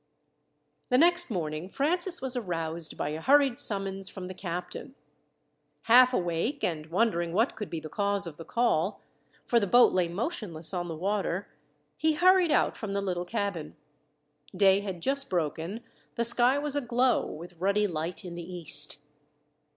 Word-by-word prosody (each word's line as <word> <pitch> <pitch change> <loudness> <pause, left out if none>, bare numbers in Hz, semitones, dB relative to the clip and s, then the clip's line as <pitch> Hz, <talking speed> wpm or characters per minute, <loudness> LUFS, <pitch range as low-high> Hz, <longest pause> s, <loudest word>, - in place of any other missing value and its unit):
The 250 - +4
next 350 +3 +4
morning 165 -3 -4
Francis 345 - 0
was 260 -1 -2
aroused 165 -7 -3
by - - -2
a 155 +1 -5
hurried 275 - +4
summons 195 -1 -1
from 185 -2 -8
the 185 - -7
captain. 180 +8 -6 0.9
Half 250 +2 +6
awake, 180 - -2
and 155 -3 -2
wondering 175 -2 0
what 225 +7 +1
could 210 - -6
be 165 - -4
the 155 - -8
cause 200 +3 0
of 160 -3 -8
the 165 - -8
call, 205 -4 0 0.4
for 235 - +3
the 200 - -1
boat 245 +5 +6
lay 180 -2 +2
motionless 180 - -4
on 175 -1 -2
the 165 - -5
water, 195 +1 -2 0.5
he 315 0 +2
hurried 365 +2 +4
out - - +2
from 210 -3 -5
the 200 - -1
little 180 -2 -2
cabin. 200 -6 -4 0.8
Day 195 -1 +5
had 190 -4 -6
just 275 0 -1
broken, 175 +5 -3 0.3
the 235 - 0
sky 240 +3 +4
was 290 0 -2
aglow 250 -2 +1
with 170 +2 -10
ruddy 200 +2 +2
light 175 +1 -4
in 175 - -7
the 170 +1 -8
east. 150 -4 +3
195 Hz, 165 wpm, -28 LUFS, 170-245 Hz, 0.9 s, Half